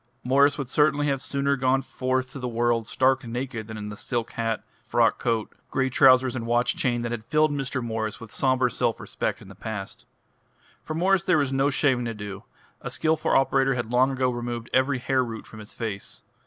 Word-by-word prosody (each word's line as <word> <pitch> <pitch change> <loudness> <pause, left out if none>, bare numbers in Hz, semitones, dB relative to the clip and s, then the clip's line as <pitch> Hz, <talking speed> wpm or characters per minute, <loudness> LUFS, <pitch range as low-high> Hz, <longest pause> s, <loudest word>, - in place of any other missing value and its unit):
Mwres 140 +3 +4
would 140 -3 -3
certainly 145 +2 +2
have 140 -2 0
sooner 140 0 0
gone 130 0 +1
forth 130 0 -2
to 140 - -8
the 125 - -3
world 120 -1 0
stark 130 0 +2
naked 120 -1 -4
than 110 -1 -7
in 105 0 -6
the 105 - -7
silk 115 +1 -3
hat, 115 -1 -2 0.2
frock - - +2
coat, 115 -2 -1 0.2
grey 130 0 0
trousers 130 0 +5
and 115 -2 -4
watch 120 +1 +2
chain 120 -2 0
that 120 - -3
had 115 -2 -4
filled 155 +4 +2
Mr. 135 -3 -2
Morris 110 -2 -3
with 115 -1 -11
sombre 130 -2 +2
self 120 -1 0
respect - - -3
in - - -14
the 100 - -11
past. 105 0 -7 0.7
For 155 - -5
Mwres 185 +2 +2
there 180 -3 +4
was 140 -3 0
no 135 +1 +2
shaving 135 -4 +1
to 115 -1 -3
do: 100 -1 -7 0.4
a - - -5
skilful 160 0 0
operator 135 0 +3
had 120 -2 -3
long 125 +2 +4
ago 130 -1 0
removed 120 -1 -5
every 130 +1 +3
hair 130 +1 +1
root 115 -2 -6
from 110 - -12
his 105 0 -11
face. 110 -4 -5
125 Hz, 210 wpm, -25 LUFS, 115-135 Hz, 0.7 s, trousers